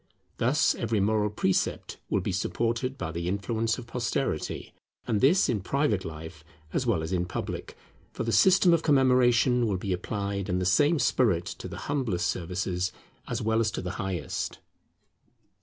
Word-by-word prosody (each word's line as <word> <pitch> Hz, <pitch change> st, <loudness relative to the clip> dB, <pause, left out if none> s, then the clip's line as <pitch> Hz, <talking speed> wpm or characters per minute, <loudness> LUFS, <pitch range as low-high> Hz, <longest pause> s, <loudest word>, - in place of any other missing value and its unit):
Thus 135 Hz, +6 st, +3 dB
every 115 Hz, -2 st, -1 dB
moral 105 Hz, +1 st, +2 dB
precept 100 Hz, -2 st, -1 dB
will 100 Hz, -, +1 dB
be 100 Hz, -, -2 dB
supported 115 Hz, +7 st, -1 dB
by 80 Hz, -, -4 dB
the 85 Hz, +1 st, -4 dB
influence 110 Hz, +4 st, -1 dB
of 125 Hz, -, -8 dB
posterity; 120 Hz, -, -2 dB, 0.3 s
and 105 Hz, -3 st, 0 dB
this 165 Hz, +9 st, +5 dB
in 115 Hz, -4 st, 0 dB
private 115 Hz, -3 st, 0 dB
life 80 Hz, -1 st, -8 dB, 0.3 s
as 130 Hz, -, 0 dB
well 95 Hz, -9 st, +1 dB
as 80 Hz, +4 st, -4 dB
in 90 Hz, -1 st, 0 dB
public, 95 Hz, -, -5 dB, 0.3 s
for -, -, -4 dB
the 115 Hz, -, -1 dB
system 180 Hz, -, +5 dB
of 165 Hz, -, +3 dB
commemoration 125 Hz, -4 st, +4 dB
will 100 Hz, -3 st, 0 dB
be 95 Hz, +1 st, -2 dB
applied 100 Hz, +1 st, -3 dB
in 90 Hz, -, +1 dB
the 90 Hz, -, -1 dB
same 145 Hz, -, +4 dB
spirit 110 Hz, -, +2 dB
to -, -, -7 dB
the -, -, -7 dB
humblest 125 Hz, -11 st, -1 dB
services 90 Hz, +1 st, -2 dB, 0.4 s
as 120 Hz, -1 st, -3 dB
well 110 Hz, +1 st, +2 dB
as 115 Hz, -1 st, +2 dB
to -, -, -4 dB
the 90 Hz, -, -3 dB
highest. 95 Hz, -6 st, -3 dB
110 Hz, 170 wpm, -27 LUFS, 90-125 Hz, 0.4 s, this